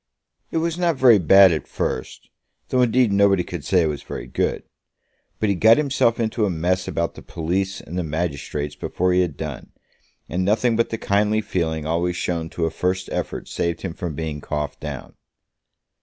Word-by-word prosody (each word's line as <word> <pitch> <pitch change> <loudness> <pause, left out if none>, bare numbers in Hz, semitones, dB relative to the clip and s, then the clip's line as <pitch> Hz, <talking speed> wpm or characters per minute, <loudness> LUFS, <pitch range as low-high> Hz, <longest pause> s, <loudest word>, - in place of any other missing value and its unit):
"It - - -2
was 165 +1 -1
not 170 -2 +2
very 125 -5 +6
bad 95 +2 +7
at 80 - -2
first; - - -4 0.4
though 130 - +2
indeed 125 -1 +3
nobody 100 -2 +4
could 85 -4 -6
say 90 -3 +3
it - - +1
was 75 -2 -3
very - - -7
good. - - -1 0.8
But 110 - +1
he - - +3
got 110 +5 +5
himself 140 -6 +1
into 110 0 0
a 105 - +2
mess 90 +2 0
about 85 0 -1
the - - -11
police 95 +4 -2
and 85 - -9
the - - -1
magistrates 75 -2 -3
before 90 +4 -1
he 90 - +4
had 90 - -2
done, 75 -5 -6 0.6
and 90 +3 -1
nothing 110 +4 +2
but 115 +1 +1
the 115 - -3
kindly 105 +1 +1
feeling 80 -7 -2
always 85 +2 0
shown 85 -2 -2
to 85 - -2
a 80 - -1
first 95 +3 -2
effort - - -4
saved 85 -1 -2
him 90 -4 -3
from 85 -4 -5
being 75 -1 -4
coughed 75 -1 -4
down." - - -7
90 Hz, 190 wpm, -22 LUFS, 80-110 Hz, 0.8 s, bad